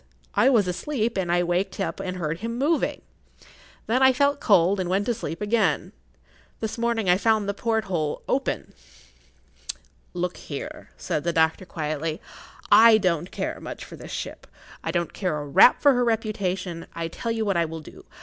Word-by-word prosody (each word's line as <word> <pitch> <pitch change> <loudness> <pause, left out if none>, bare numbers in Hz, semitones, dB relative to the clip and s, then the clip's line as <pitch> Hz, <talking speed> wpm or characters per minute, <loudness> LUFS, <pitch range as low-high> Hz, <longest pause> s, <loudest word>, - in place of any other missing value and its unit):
I - - +4
was 220 -8 +3
asleep, 230 +5 -1
but 190 -4 -2
I 175 +1 +3
waked 180 +3 -1
up 195 - -2
and 185 0 -4
heard 165 -1 -3
him 230 +3 -4
moving. 300 +5 0 0.8
Then 250 +4 +1
I 265 0 +6
felt 280 +2 +2
cold 195 -1 +4
and 180 -2 -2
went 195 +2 +1
to 240 - +1
sleep 210 -6 -6
again. 200 -6 +1 0.7
This 220 +1 -4
morning 235 -3 0
I 180 0 +5
found 220 -2 +2
the 200 - 0
porthole 195 -8 -1
open." 275 - -1 1.4
"Look 180 0 -2
here," 145 - -7
said 150 - -2
the 170 - +1
doctor, 160 +2 +1
quietly, 155 0 -3 0.5
"I 220 +2 +8
don't 180 -4 0
care - - -4
much - - -7
for - - -11
this - - -11
ship. - - -6 0.4
I - - -3
don't 170 -2 -1
care 180 -6 -1
a 145 - -5
rap 145 - +6
for 285 -1 +7
her 245 -1 +2
reputation. 195 -7 -2
I 165 0 -2
tell 230 +8 -4
you 225 -1 -1
what 200 -2 +1
I 170 -1 +2
will 160 0 -6
do. - - -14
195 Hz, 180 wpm, -25 LUFS, 170-225 Hz, 1.4 s, I